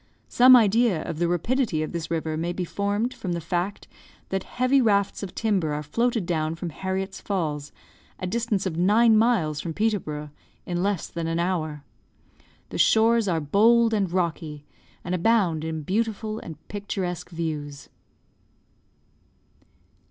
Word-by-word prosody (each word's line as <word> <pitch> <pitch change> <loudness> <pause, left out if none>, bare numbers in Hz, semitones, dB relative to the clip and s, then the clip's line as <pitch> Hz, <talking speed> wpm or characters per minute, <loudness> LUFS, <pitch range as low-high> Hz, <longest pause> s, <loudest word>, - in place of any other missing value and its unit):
Some 255 +1 +8
idea 225 -5 +3
of 160 - -5
the 175 - +2
rapidity 175 - 0
of 155 - -5
this 165 -2 -4
river 160 -1 -2
may 170 +2 -2
be 180 0 -3
formed 205 +6 -1
from 180 -3 -4
the 170 - -2
fact 175 +4 -3 0.4
that 190 0 -1
heavy 255 +6 +1
rafts 200 -4 +1
of 195 -3 -7
timber 190 -9 0
are 150 +1 -3
floated 230 +6 0
down 160 -2 -1
from 170 0 -5
Herriot's 190 +2 -4
Falls, 150 -7 -3 0.5
a 185 - -5
distance 215 0 -1
of 180 -4 -2
nine 220 +5 +5
miles 205 -10 +2
from 165 -2 -5
Peterborough, 155 -9 -2 0.3
in 175 0 -2
less 200 -2 0
than 165 -1 -4
an 165 0 -1
hour. 160 -4 -2 0.9
The - - -5
shores 225 0 +4
are 170 -3 +1
bold 225 +9 +4
and 195 -5 0
rocky, 160 -4 -2 0.4
and 180 - -3
abound 180 -4 +2
in 160 -1 -4
beautiful 215 +3 -2
and 160 -3 -9
picturesque 195 -4 -4
views. 150 -4 -5
185 Hz, 150 wpm, -25 LUFS, 160-215 Hz, 0.9 s, Some